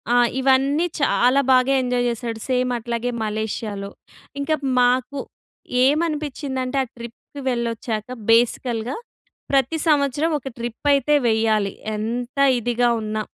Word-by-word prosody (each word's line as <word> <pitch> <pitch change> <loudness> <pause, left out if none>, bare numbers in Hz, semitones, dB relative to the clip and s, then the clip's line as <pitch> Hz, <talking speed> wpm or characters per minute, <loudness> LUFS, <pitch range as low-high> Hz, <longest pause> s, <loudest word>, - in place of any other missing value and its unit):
ఆహ్, 245 0 +5
ఇవన్నీ 270 +5 +3 0.2
చాలా 270 0 +3
బాగా 255 +1 +4
ఎంజాయ్ 245 -1 0
చేసాడు. 230 -1 -4
సేమ్ 250 0 +1
అట్లాగే 235 +1 -3
మలేషియాలో. 210 -1 -4 0.5
ఇంకా 310 +2 +1 0.3
మాకు 250 +3 +1 0.7
ఏమనిపించిందంటే, 290 -4 -1
ఆ - - -5
ట్రిప్‌ 235 +4 -10
వెళ్ళొచ్చాక. 230 -2 -2 0.2
బేసికల్‌గా 235 +1 +1 0.6
ప్రతి 275 +4 +2
సంవత్సరం 290 +1 +2
ఒక 270 0 -7
ట్రిప్ 235 +4 -5
అయితే 295 +2 +3
వెయ్యాలి. 220 -3 +1 0.2
ఎంత 240 +4 -4 0.2
ఇదిగా 240 +1 +1
ఉన్నా... 215 0 -2
245 Hz, 110 wpm, -22 LUFS, 230-275 Hz, 0.7 s, ఆహ్